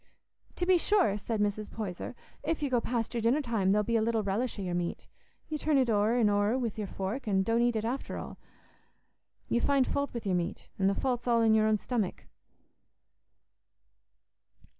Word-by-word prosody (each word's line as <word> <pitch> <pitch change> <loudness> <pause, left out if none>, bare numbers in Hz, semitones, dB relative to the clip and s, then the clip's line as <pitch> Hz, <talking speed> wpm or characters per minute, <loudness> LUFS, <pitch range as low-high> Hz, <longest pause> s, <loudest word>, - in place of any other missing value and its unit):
"To 355 - -1
be 365 -1 +5
sure," 375 - +3
said 220 +1 -3
Mrs. 205 0 -1
Poyser; 205 +1 -5 0.3
"if 320 -2 -2
you 280 - -1
go 245 -2 +3
past 230 -1 -2
your 235 - -1
dinner 235 +6 +3
time, 225 -9 +1
there'll 210 +1 +3
be 230 +2 +1
little 225 0 +1
relish 220 +5 -1
o' 200 - -4
your 180 -1 -3
meat. 175 -1 -3 0.4
You 310 -1 -3
turn 305 -1 +2
it 255 -3 +3
o'er 210 +2 +2
an' 235 -3 +4
o'er 205 +3 +2
wi' 240 -4 -1
your 210 -2 -4
fork, 195 +8 -4
an' 190 -2 +2
don't 230 +3 +2
eat 240 -1 +2
it 220 0 -1
after 250 +4 -3
all. - - -8 1.1
You 235 - +1
find 275 -1 +3
faut 280 +2 -1
wi' 235 - -4
your 190 - +1
meat, 175 -1 -2
an' 190 - +3
the 195 - +2
faut's 250 0 -1
all 235 -1 +4
i' - - +4
your 220 -1 +4
own 215 0 +3
stomach." 215 -3 -2
225 Hz, 200 wpm, -30 LUFS, 205-250 Hz, 1.1 s, be